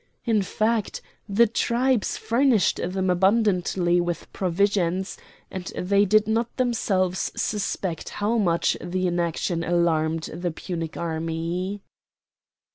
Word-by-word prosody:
In 225 -4 +2
fact, 215 +2 -1 0.3
the 215 +4 +5
tribes 240 +1 +1
furnished 235 -3 +2
them 185 +1 -1
abundantly 185 -2 +2
with 175 -1 -4
provisions, 190 0 0 0.4
and 185 -1 -5
they 200 +2 +3
did 215 +2 +3
not 225 +2 -1
themselves 195 -7 0
suspect 195 -4 -2
how 220 +3 0
much 170 -5 +2
their 180 +1 -1
inaction 170 0 -1
alarmed 165 -2 +1
the 175 +2 -2
Punic 165 -1 -5
army. 165 +4 -3
185 Hz, 110 wpm, -24 LUFS, 175-210 Hz, 0.4 s, the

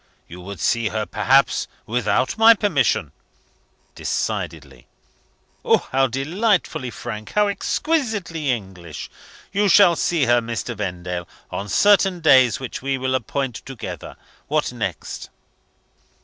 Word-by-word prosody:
you 90 +2 -10
would 100 0 -8
see 115 +3 +1
her 110 0 -2
perhaps 135 +2 +2 0.2
without 125 +2 0
my 225 +1 +7
permission?" 135 - +1 0.8
"Decidedly!" - - -4 1.0
"How 135 0 +3
delightfully 155 - 0
frank! 110 -1 -7
How 210 0 +3
exquisitely 205 - -1
English! 95 - -5 0.4
You 205 +1 +2
shall 175 -2 +6
see 170 -5 +1
her, 120 0 +4
Mr. 115 +1 -4
Vendale, 90 -3 -4 0.2
on 100 +1 -4
certain 195 - +4
days, 130 -7 +5
which 130 -3 -6
we 135 0 -1
will 130 0 -1
appoint 130 -1 -2
together. 130 -3 -8 0.3
What - - 0
next?" - - -5
130 Hz, 115 wpm, -21 LUFS, 110-175 Hz, 1.0 s, my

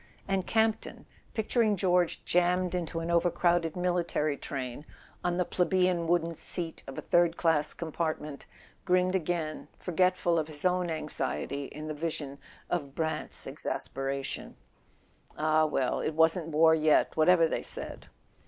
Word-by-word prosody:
And 195 -2 0
Campton, 220 -1 0 0.3
picturing 220 -1 +2
George 180 -2 +1
jammed 180 +1 +2
into 165 -2 -2
an 165 +1 -2
overcrowded 170 -1 +2
military 175 -4 0
train, 135 -1 -5 0.4
on 175 0 0
the 180 - +1
plebeian 180 -1 +1
wooden 170 -1 +1
seat 165 +1 -4
of 135 - -8
a - - -4
third 175 -1 +3
class 155 -3 +2
compartment, 155 -3 -4 0.4
grinned 185 0 +2
again, 165 -3 -2
forgetful 180 -1 +1
of 155 - -2
his 150 +1 -8
own 180 -1 +2
anxiety 150 -2 -3
in 155 +3 -8
the 155 - -3
vision 150 -3 -4 0.3
of 145 -5 -3
Brant's 160 -1 -3
exasperation. 135 0 -4 0.8
Ah, 155 0 +3
well, 135 -4 0
it 155 - -2
wasn't 160 +1 +3
war 160 +1 +5
yet, 155 -1 +3
whatever 165 +1 +5
they - - -2
said! - - -2
165 Hz, 135 wpm, -29 LUFS, 155-180 Hz, 0.8 s, war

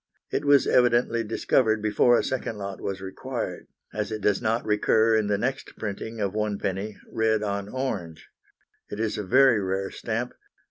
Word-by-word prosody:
It 145 - -1
was 140 -1 +5
evidently 120 -1 +3
discovered 110 0 +1
before 110 +3 +4
a - - +1
second 125 -4 -3
lot 100 -1 -6
was 95 -1 -4
required, 95 0 -5 0.3
as 105 0 -3
it 110 - -3
does 105 -1 +1
not 115 0 0
recur 110 +1 +3
in 110 -2 +1
the 105 -1 +1
next 130 +5 -3
printing 110 +2 -5
of 100 -2 -1
1d., 105 -1 -2 0.2
red 110 -1 +1
on 100 -1 -3
orange. 105 -11 -4 0.6
It 105 - -6
is 110 -1 -1
a - - -2
very 130 +2 +5
rare 95 0 -2
stamp. 115 +2 -3
110 Hz, 170 wpm, -26 LUFS, 100-115 Hz, 0.6 s, was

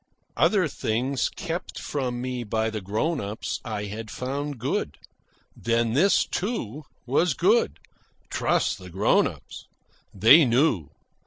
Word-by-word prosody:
Other 195 -6 +3
things 130 +1 -1
kept 175 0 -5
from 125 -4 -3
me 125 -1 -3
by 110 0 -1
the 110 -1 -4
grown 110 - -1
ups 105 +2 -4
I 105 -3 -4
had 105 +2 -6
found 140 +5 -4
good. 115 - -2 0.6
Then 115 0 0
this, 185 +10 +4
too, 155 - -3 0.2
was 140 +4 +2
good. 210 +8 +2 0.5
Trust - - +1
the 90 -1 -10
grown 95 +4 +3
ups. - - -10 0.5
They 115 - +7
knew. 120 - +2
125 Hz, 130 wpm, -25 LUFS, 110-150 Hz, 0.6 s, They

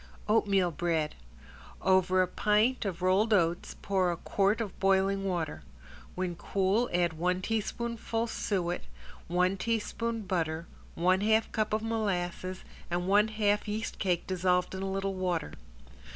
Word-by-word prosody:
~OATMEAL 200 -4 +3
BREAD~ 160 -2 -1 0.7
Over 185 0 +4
a - - -1
pint 210 +6 +2
of 185 -2 -3
rolled 195 +5 +3
oats 170 -2 0
pour 190 -3 +2
a 170 - -3
quart 200 +5 +1
of 215 -5 -5
boiling 195 0 +2
water. 170 -5 -2 0.5
When 180 -1 -2
cool 195 +6 +1
add 175 -1 +1
one 180 +3 0
teaspoonful 225 +1 -2
suet, 185 -6 -2 0.5
one 180 +2 +1
teaspoon 230 +2 -2
butter, 165 -3 -1 0.3
one 185 +3 +3
half 220 +1 +2
cup 215 -1 0
molasses 185 -4 -2 0.3
and 175 +1 -1
one 205 +2 +5
half 210 -1 +1
yeast 215 +2 -3
cake 180 -3 0
dissolved 180 -1 +1
in 190 - -4
a 195 - -2
little 195 0 -1
water. 180 -4 -2
190 Hz, 135 wpm, -30 LUFS, 180-210 Hz, 0.7 s, one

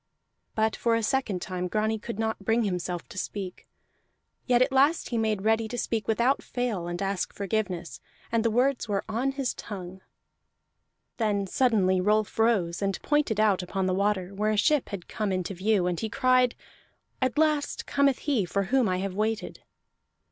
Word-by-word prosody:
But 220 0 +1
for 230 -1 +1
a 230 - 0
second 220 -7 0
time 180 -1 -3
Grani 215 +3 0
could 230 0 -6
not 220 0 -1
bring 225 +3 +2
himself 180 -3 -3
to 185 - -5
speak. 190 -3 -6 0.8
Yet 250 -1 +5
at 265 - -2
last 280 +5 +3
he 235 - -1
made 215 -3 0
ready 220 +1 +2
to 245 - -5
speak 225 -3 -2
without 235 +5 +2
fail 230 -9 -3
and 175 0 -4
ask 195 -1 -1
forgiveness, 195 -4 -3 0.3
and 230 -1 +2
the 230 - +3
words 245 +1 +1
were 200 -1 0
on 240 +5 -1
his 270 -2 -1
tongue. 190 -3 -8 1.2
Then 205 -3 +1
suddenly 190 -4 +2
Rolf 210 +2 +1
rose, 200 -7 +2
and 195 -2 -1
pointed 295 -8 +1
out 205 -3 +3
upon 190 +1 -2
the 185 - +1
water, 200 -1 0
where 210 +2 0
a 215 - +1
ship 300 +5 +2
had 195 -4 -6
come 210 -2 -2
into 185 0 -2
view; 195 0 +1
and 180 -2 -1
he 220 - -2
cried, 255 +1 +3 0.7
"At 260 +2 0
last 305 -2 +1
cometh 280 -2 +2
he 275 -8 +2
for 200 +3 -1
whom 255 -6 +4
I 185 - +1
have 190 0 -3
waited!" 215 +2 -2
215 Hz, 180 wpm, -27 LUFS, 190-240 Hz, 1.2 s, Yet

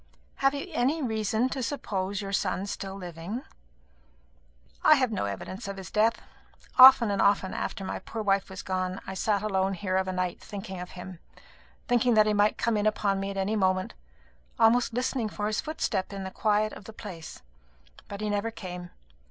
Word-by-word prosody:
"Have 275 +1 +2
you 280 - -4
any 285 +4 +1
reason 220 0 0
to 265 - -3
suppose 205 -6 -2
your 195 0 -5
son 195 0 0
still 195 -1 -5
living?" 180 - -6 1.4
"I 310 - +8
have 255 -4 +1
no 200 - -1
evidence 100 - -5
of 200 0 -5
his 190 -3 -8
death. 225 +2 +2 0.6
Often 255 -4 +10
and 200 - +1
often, 200 -2 +3
after 195 - -4
my - - -4
poor 225 -1 -5
wife 195 -1 +1
was 190 0 -7
gone, 185 0 -2
I - - -5
have 190 - -5
sat 210 -2 +1
alone 195 -2 0
here 185 0 -1
of 190 0 0
a - - -1
night 180 -1 -2
thinking 190 -2 -7
of 180 0 -8
him; 180 -1 -8 0.7
thinking 245 -1 +3
that 215 -1 +6
he 215 - +2
might 205 +1 +3
come 230 -2 +1
in 205 +1 +1
upon 205 -2 +1
me 195 0 -3
at 195 - -5
any 195 +3 0
moment; 185 -2 +1 0.6
almost 235 +2 +4
listening 245 -1 -1
for 205 0 -4
his 215 +1 0
footstep 255 -12 -2
in 195 -1 -5
the 190 - -5
quiet 215 +1 +1
of 200 - -11
the 220 - -10
place. 180 -8 -9 0.6
But 200 0 -7
he 215 - -1
never 205 +2 0
came. 180 -5 -7
200 Hz, 195 wpm, -28 LUFS, 190-220 Hz, 1.4 s, Often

